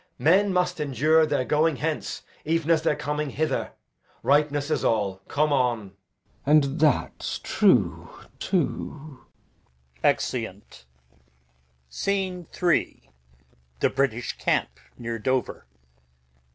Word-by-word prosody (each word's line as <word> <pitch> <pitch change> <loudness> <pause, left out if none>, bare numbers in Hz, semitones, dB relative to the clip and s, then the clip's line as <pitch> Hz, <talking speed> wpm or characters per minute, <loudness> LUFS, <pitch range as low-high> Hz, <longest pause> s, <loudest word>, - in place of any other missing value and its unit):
Men 195 +6 +4
must 180 -2 0
endure 150 +3 +3
Their 145 -4 0
going 155 +2 +2
hence, 155 +3 -3 0.2
even 165 +1 0
as 160 -2 +4
their 160 -2 +1
coming 150 +1 -2
hither; 155 +4 -2 0.5
Ripeness 145 +1 +2
is - - 0
all. 100 -4 +1
Come 150 0 +1
on. 120 -6 0
Glou. - - -26 0.6
And 155 -1 +7 0.2
that's 150 -4 +1
true - - +2 0.3
too. 150 -3 -2 0.8
Exeunt. - - -1 1.0
Scene 185 - -2 0.2
III. 170 - +1 0.7
The - - +2
British 125 -3 -1
camp, - - 0 0.2
near 115 -1 -4
Dover. 130 - -2
150 Hz, 105 wpm, -25 LUFS, 130-160 Hz, 1.0 s, And